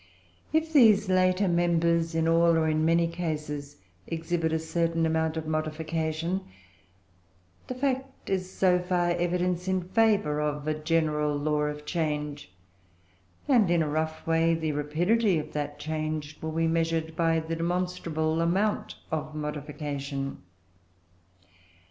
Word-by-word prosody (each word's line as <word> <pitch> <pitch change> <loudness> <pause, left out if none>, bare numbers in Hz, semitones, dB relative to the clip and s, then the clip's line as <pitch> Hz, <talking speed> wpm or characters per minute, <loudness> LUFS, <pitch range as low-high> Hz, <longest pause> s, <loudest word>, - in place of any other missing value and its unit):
If 315 0 0
these 215 -8 +6
later 185 +1 +3
members, 170 -1 +2
in 165 0 +2
all 165 0 +4
or 160 -1 +2
in 155 0 +1
many 165 +1 +3
cases, 150 -4 -4 0.3
exhibit 165 0 -1
a 160 - +2
certain 165 +1 0
amount 160 0 0
of 160 - -3
modification, 160 +3 -2 1.3
the 255 - -4
fact 265 0 -3
is, 185 -1 -1
so 180 -2 +3
far, 180 -1 +1
evidence 175 +1 0
in 185 -1 0
favour 200 -6 +2
of 150 0 -2
a 155 - +2
general 155 -1 0
law 150 0 0
of 150 0 -5
change; 150 - -3 1.0
and, 235 -9 +4
in 170 -2 +3
a - - -2
rough 160 +1 -2
way, 165 0 +3
the 160 -1 -1
rapidity 175 +8 +1
of 155 - -5
that 145 0 -3
change 155 0 -3
will 160 0 -4
be 165 +1 +1
measured 165 -1 0
by 165 -1 +2
the 160 +1 -4
demonstrable 165 -2 -1
amount 195 +5 0 0.2
of 155 -1 -3
modification. 145 -2 -4
165 Hz, 135 wpm, -27 LUFS, 155-175 Hz, 1.3 s, these